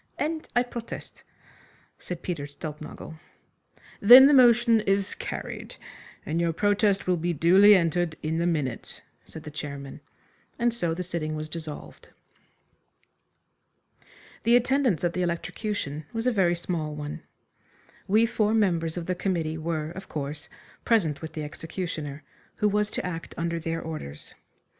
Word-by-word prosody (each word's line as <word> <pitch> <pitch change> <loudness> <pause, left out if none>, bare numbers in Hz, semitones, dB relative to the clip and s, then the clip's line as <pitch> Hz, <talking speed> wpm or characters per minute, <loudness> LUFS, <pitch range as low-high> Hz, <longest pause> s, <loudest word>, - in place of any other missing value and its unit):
"And 315 +1 -2
I 245 - +4
protest," 240 -2 -8 0.8
said 180 -2 -6
Peter 160 -6 -3
Stulpnagel. 155 +2 -8 0.8
"Then 245 +6 +10
the 290 - +6
motion 240 -3 +6
is 195 -2 0
carried, - - -6 0.5
and 165 +2 -1
your 170 -1 +1
protest 205 +2 +2
will 180 -1 +2
be 170 +1 -1
duly 190 +7 +7
entered 175 -2 +1
in 160 +1 -1
the 170 - +1
minutes," 145 -8 -2 0.2
said 160 - -10
the 150 - -8
chairman, 140 -2 -7 0.6
and 235 -1 +1
so 170 -8 -1
the 180 - -3
sitting 165 -3 -3
was 155 0 -5
dissolved. 155 -2 -8 2.3
The 235 +1 +4
attendance 245 - +2
at 175 -1 +1
the 180 - -1
electrocution 170 -3 -3
was 225 +1 -2
a 250 - +4
very 185 -6 +2
small 165 -3 -3
one. 150 0 -6 0.9
We 215 +4 +4
four 220 -1 +1
members 170 -6 +1
of 170 - -3
the 185 - 0
committee 165 -4 -2
were, 155 -1 -3
of 190 +2 -9
course, 150 0 -5 0.3
present 170 -11 +2
with 160 - -7
the 155 - -4
executioner, 155 -1 -5 0.3
who 210 - +1
was 210 0 +1
to - - -3
act 165 -2 -6
under 170 0 -1
their 165 0 -3
orders. 155 - -7
170 Hz, 145 wpm, -26 LUFS, 155-205 Hz, 2.3 s, Then